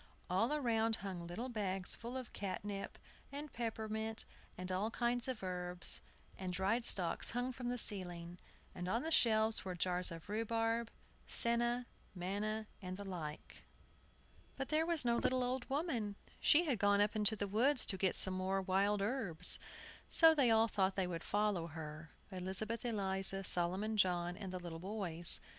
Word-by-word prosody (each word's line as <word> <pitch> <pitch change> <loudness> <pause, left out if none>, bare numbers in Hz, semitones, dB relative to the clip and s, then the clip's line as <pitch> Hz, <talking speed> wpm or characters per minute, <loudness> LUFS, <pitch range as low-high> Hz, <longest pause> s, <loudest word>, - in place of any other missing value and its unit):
All 220 +8 +2
around 230 -6 +1
hung 175 -3 -5
little 195 +9 -5
bags 195 -6 -2
full 240 +3 -6
of 255 -3 -7
catnip, 200 0 -5 0.3
and 290 +1 -7
peppermint, 220 -1 -1 0.3
and 185 0 -5
all 195 +4 -1
kinds 240 +1 0
of 255 -6 -4
herbs; 180 -1 -1 0.4
and 185 -1 -4
dried 195 +6 0
stalks 180 -6 +3
hung 250 +1 -1
from 245 -1 -5
the 245 - -2
ceiling; 175 -5 +1 0.3
and 180 0 -6
on 230 +7 0
the 320 - -3
shelves 220 -6 +4
were 185 -1 -5
jars 180 +1 +1
of 165 -1 -9
rhubarb, 225 +2 -1 0.4
senna, 240 +1 +3 0.3
manna, 205 +4 -3 0.2
and 185 -1 -6
the 200 - -5
like. 160 -6 -7 1.0
But 270 0 -4
there 315 +1 +1
was 335 -6 +1
no 235 0 +2
little 255 +1 +1
old 250 0 -3
woman. 265 - -2 0.2
She 330 +4 +5
had 260 -9 -1
gone 205 0 +3
up 205 +2 +2
into 215 0 +2
the 205 -1 -3
woods 245 +7 +3
to 195 - 0
get 190 -1 +1
some 190 - +1
more 190 +1 -1
wild 195 +2 +1
herbs, 200 -8 +3 0.5
so 325 -1 +8
they 275 -6 +3
all 225 0 +4
thought 195 -3 0
they 190 - 0
would 170 -2 -5
follow 205 -5 0
her, 155 0 -8 0.2
Elizabeth 190 +6 -3
Eliza, 195 -4 +3
Solomon 190 +5 +2
John, 175 -3 +1
and 190 -1 -7
the 185 - -4
little 170 -2 -7
boys. 175 -3 +1
205 Hz, 165 wpm, -36 LUFS, 185-235 Hz, 1.0 s, so